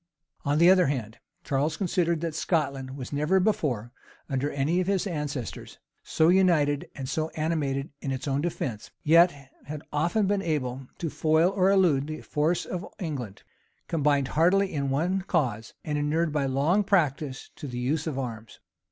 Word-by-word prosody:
On 145 +1 +1
the 170 +3 +7
other 185 -2 +5
hand, 115 -6 -3 0.2
Charles 145 +3 0
considered 170 -3 0
that 165 -2 -2
Scotland 140 -5 -1
was 130 +1 -7
never 150 +6 +2
before, 140 - 0 0.4
under 135 +1 -1
any 150 +5 0
of 180 - -3
his 195 -1 +1
ancestors, 150 - -5 0.2
so 160 +1 +2
united 170 -6 +3
and 135 -2 -5
so 155 +4 -1
animated 150 -3 -1
in 135 - -3
its 135 +2 -4
own 140 0 0
defence; 135 -9 -3
yet 160 -3 +4 0.2
had 150 0 -6
often 175 +8 +1
been 200 0 +1
able 135 -6 -2
to 165 -3 -3
foil 160 +3 +3
or 190 -1 +3
elude 170 -8 +3
the 155 0 -5
force 155 +4 0
of 180 0 -4
England, 135 - -5 0.4
combined 145 -4 +1
heartily 185 +5 +3
in 140 -2 -1
one 175 +8 0
cause, 130 - -1
and 150 -1 -1
inured 155 +2 +1
by 145 -3 +1
long 150 +10 +2
practice 150 -8 0
to 145 - -7
the 125 -2 -6
use 145 +6 -1
of 150 -4 -3
arms. 115 -4 -6
150 Hz, 170 wpm, -27 LUFS, 135-170 Hz, 0.4 s, the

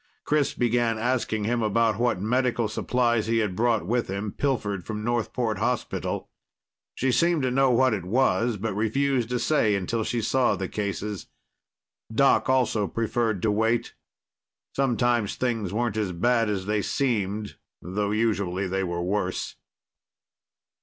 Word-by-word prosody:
Chris 150 -2 +1
began 120 -1 +1
asking 115 -2 -1
him 120 +2 0
about 110 0 +1
what 120 -6 +1
medical 120 +2 +1
supplies 120 0 0
he 115 0 +1
had 105 -5 0
brought 115 -3 +1
with 120 +5 0
him, 100 +2 -3
pilfered 105 -9 -1
from 105 +2 -5
Northport 115 -2 -1
hospital. 120 +2 -2 0.7
She 130 0 +1
seemed 170 +1 +2
to 130 - +1
know 135 +1 +3
what 130 0 +3
it 100 -5 -2
was, 120 +2 +1
but 105 +1 -3
refused 120 +3 0
to 125 - 0
say 120 -6 +2
until 110 +4 -1
she 120 - -1
saw 125 +3 +2
the 95 - -3
cases. 100 -1 -4 0.8
Doc 135 +4 +3
also 125 -6 +2
preferred 115 -2 -1
to 110 - +3
wait. 110 +2 0 0.8
Sometimes 120 -5 +1
things 115 -7 -1
weren't 115 +1 -1
as 100 -4 -1
bad 115 +5 +2
as 95 -3 -2
they 105 0 0
seemed, 105 -5 -1 0.2
though 100 +4 -2
usually 100 -4 0
they 95 +1 -1
were 85 -1 -2
worse. 95 0 -2
115 Hz, 145 wpm, -26 LUFS, 105-120 Hz, 0.8 s, know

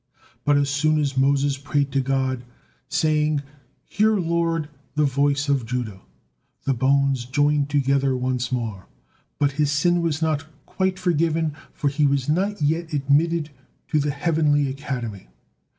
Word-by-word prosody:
But 145 -1 +4
as 140 -1 +1
soon 155 +2 +2
as 140 -2 -1
Moses 140 +1 +2
prayed 140 0 -1
to 135 - +1
God, 130 -1 -1 0.5
saying, 150 -2 +1 0.4
"Hear, 215 +1 +2
Lord, 165 -3 0 0.3
the 150 0 +3
voice 140 +1 +1
of 140 -3 +1
Judah," 110 -6 -4 0.6
the 135 - +1
bones 135 0 +2
joined 145 +2 +1
together 140 -2 +2
once 125 0 -1
more, 110 -7 -3 0.5
but 145 -1 +2
his 145 -1 +2
sin 175 +4 +2
was 160 -3 0
not 160 -2 -1 0.2
quite 190 -1 -1
forgiven, 165 -3 +1 0.2
for 145 - -2
he 145 +1 +2
was 140 -2 0
not 185 +3 0
yet 160 +2 0
admitted 150 +3 +1 0.4
to 155 - +2
the 145 0 0
heavenly 145 -1 +1
academy. 125 - -5
145 Hz, 145 wpm, -23 LUFS, 135-155 Hz, 0.6 s, But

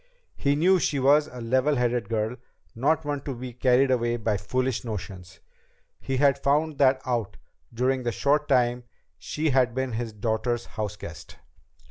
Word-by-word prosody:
He 140 0 +1
knew 180 +5 +4
she 150 - 0
was 145 +3 +4
a 125 - -10
level 130 +5 +1
headed 120 -2 0
girl, 110 +2 -1 0.4
not 150 +6 +1
one 145 -1 -2
to 135 -1 -5
be 125 0 -7
carried 125 +2 +3
away 120 -1 +1
by 110 -2 0
foolish 125 +5 -1
notions. 95 -4 -7 0.6
He 135 -1 -3
had 140 0 +3
found 150 +2 +1
that 130 -1 +4
out 120 -5 -2 0.3
during 130 +3 0
the 120 -1 -1
short 145 +4 +1
time 125 -2 +2 0.3
she 155 0 -2
had 125 -2 +2
been 130 -1 -1
his 115 0 -3
daughters' 110 +2 -2
house 105 -1 -5
guest. 85 -5 -10
125 Hz, 165 wpm, -26 LUFS, 115-140 Hz, 0.6 s, knew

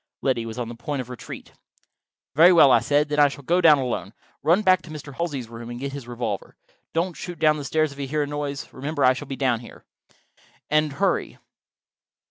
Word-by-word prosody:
Liddy 120 -4 0
was 110 - -7
on 120 -2 -3
the 120 - -7
point 135 +4 -4
of 125 -1 -6
retreat. 125 - -9 0.8
"Very 165 +5 +7
well," 160 -6 +7
I 120 - +6
said, 145 +6 +1
"then 150 0 -1
I 145 - +7
shall 140 0 -8
go 175 +6 +2
down 155 -4 +7
alone. 130 -3 -3 0.3
Run 170 +8 +3
back 185 -2 +4
to 170 - -14
Mr. 150 -2 -8
Halsey's 140 -6 -3
room 115 0 -9
and 120 0 -6
get 140 +1 -4
his 140 -4 -7
revolver. 120 0 -4 0.4
Don't 170 +2 -1
shoot 175 -2 -7
down 155 -1 +3
the 145 - -5
stairs 155 +2 0
if 140 - -12
you 140 - -3
hear 150 +2 0
a - - -4
noise: 145 -1 -4
remember—I 140 -1 +1
shall 140 +2 -7
be 135 - -4
down 125 -4 0
there. 120 - -14 0.9
And 155 -1 +2
hurry." 195 +6 -1
140 Hz, 215 wpm, -24 LUFS, 125-155 Hz, 0.9 s, Very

